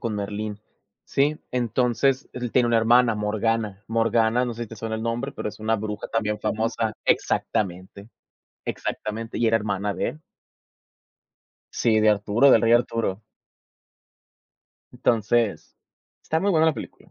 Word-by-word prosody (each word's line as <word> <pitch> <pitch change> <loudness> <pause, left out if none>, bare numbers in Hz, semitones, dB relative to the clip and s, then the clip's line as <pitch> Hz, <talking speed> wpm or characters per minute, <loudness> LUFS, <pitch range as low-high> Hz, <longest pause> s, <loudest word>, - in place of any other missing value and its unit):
con 115 -4 -2
Merlín, 105 +1 -4 0.5
¿sí? 145 +2 +1
Entonces, 125 +2 +1
él 125 -1 -4
tiene 125 0 +3
una 120 -1 +3
hermana, 115 +1 +4
Morgana. 105 -1 -1
Morgana, 115 +1 +2
no 120 - -4
sé 120 - -5
si 115 - -6
te 110 - -10
suena 110 +1 -4
el 110 - -4
nombre, 120 +4 -2
pero - - -4
es - - -15
una 110 +1 +1
bruja 105 0 -5
también 105 -2 -1
famosa. 110 +1 -1
Exactamente, 95 +1 -1 0.6
exactamente, 110 +2 -4
y 120 - +2
era 115 0 +4
hermana 100 -1 -2
de - - -2
él. 155 - -8 1.5
Sí, 110 -2 +2
de 110 - +4
Arturo, 105 +6 +3
del 115 - +6
rey 115 - +4
Arturo. 115 -4 +1 1.7
Entonces, 115 -1 0 0.5
está 160 - -1
muy 200 - +1
buena 160 -3 +4
la 160 - +3
película. - - -10
115 Hz, 145 wpm, -24 LUFS, 105-120 Hz, 1.7 s, del